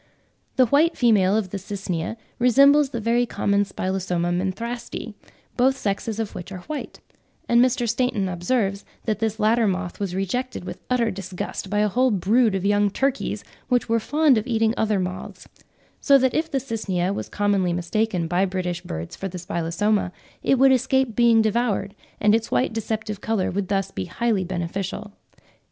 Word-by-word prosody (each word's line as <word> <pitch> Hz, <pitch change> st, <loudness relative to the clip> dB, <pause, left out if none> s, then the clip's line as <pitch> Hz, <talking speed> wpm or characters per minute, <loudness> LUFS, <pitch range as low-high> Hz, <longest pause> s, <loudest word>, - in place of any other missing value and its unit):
The 255 Hz, -, +5 dB
white 295 Hz, +7 st, +3 dB
female 210 Hz, -5 st, +4 dB
of 195 Hz, -5 st, -2 dB
the 200 Hz, -, -3 dB
Cycnia 190 Hz, 0 st, -4 dB, 0.2 s
resembles 275 Hz, +4 st, +5 dB
the 235 Hz, -, -4 dB
very 235 Hz, +2 st, +1 dB
common 200 Hz, -2 st, +1 dB
Spilosoma 185 Hz, -3 st, -2 dB
menthrasti, 220 Hz, +5 st, -3 dB, 0.4 s
both 265 Hz, +2 st, +3 dB
sexes 210 Hz, 0 st, -2 dB
of 220 Hz, -2 st, -3 dB
which 180 Hz, +2 st, -8 dB
are 185 Hz, -2 st, -7 dB
white; 300 Hz, +8 st, -6 dB, 0.5 s
and 235 Hz, 0 st, +5 dB
Mr. 250 Hz, -1 st, +1 dB
Stainton 235 Hz, -4 st, 0 dB
observed 195 Hz, +3 st, -1 dB, 0.2 s
that 215 Hz, -3 st, -1 dB
this 220 Hz, -1 st, -1 dB
latter 220 Hz, +1 st, +3 dB
moth 185 Hz, -2 st, -3 dB
was 195 Hz, -3 st, -3 dB
rejected 195 Hz, +3 st, -3 dB
with -, -, -7 dB
utter 240 Hz, -3 st, +2 dB
disgust 190 Hz, 0 st, -5 dB
by 205 Hz, -, -1 dB
a 210 Hz, -, +3 dB
whole 250 Hz, +6 st, +2 dB
brood 215 Hz, +2 st, +2 dB
of 190 Hz, 0 st, -2 dB
young 205 Hz, 0 st, +3 dB
turkeys, 270 Hz, +6 st, -1 dB, 0.3 s
which 250 Hz, -2 st, +2 dB
were 230 Hz, 0 st, +3 dB
fond 295 Hz, 0 st, +3 dB
of 215 Hz, -, -7 dB
eating 225 Hz, -2 st, +2 dB
other 215 Hz, -2 st, +1 dB
moths; 180 Hz, 0 st, -5 dB, 0.5 s
so 280 Hz, -1 st, +5 dB
that 260 Hz, -1 st, +2 dB
if 320 Hz, +1 st, 0 dB
the 275 Hz, -, -1 dB
Cycnia 200 Hz, -7 st, -2 dB
was -, -, -5 dB
commonly 200 Hz, -3 st, +1 dB
mistaken 175 Hz, +1 st, -1 dB
by 175 Hz, +3 st, +1 dB
British 180 Hz, -2 st, -3 dB
birds 80 Hz, +1 st, -6 dB
for 195 Hz, -, -4 dB
the 185 Hz, -1 st, -7 dB
Spilosoma, 180 Hz, +3 st, -1 dB, 0.3 s
it 270 Hz, -, +2 dB
would 270 Hz, +1 st, +6 dB
escape 265 Hz, -2 st, +2 dB
being 235 Hz, -2 st, +5 dB
devoured, 215 Hz, -3 st, 0 dB, 0.3 s
and 210 Hz, 0 st, +4 dB
its 225 Hz, 0 st, +1 dB
white 250 Hz, -, +1 dB
deceptive 220 Hz, -2 st, -3 dB
colour 220 Hz, -4 st, 0 dB
would 195 Hz, 0 st, -2 dB
thus 195 Hz, 0 st, -1 dB
be 95 Hz, -, -4 dB
highly 225 Hz, -, 0 dB
beneficial.) 185 Hz, +3 st, -4 dB
210 Hz, 175 wpm, -23 LUFS, 190-240 Hz, 0.5 s, would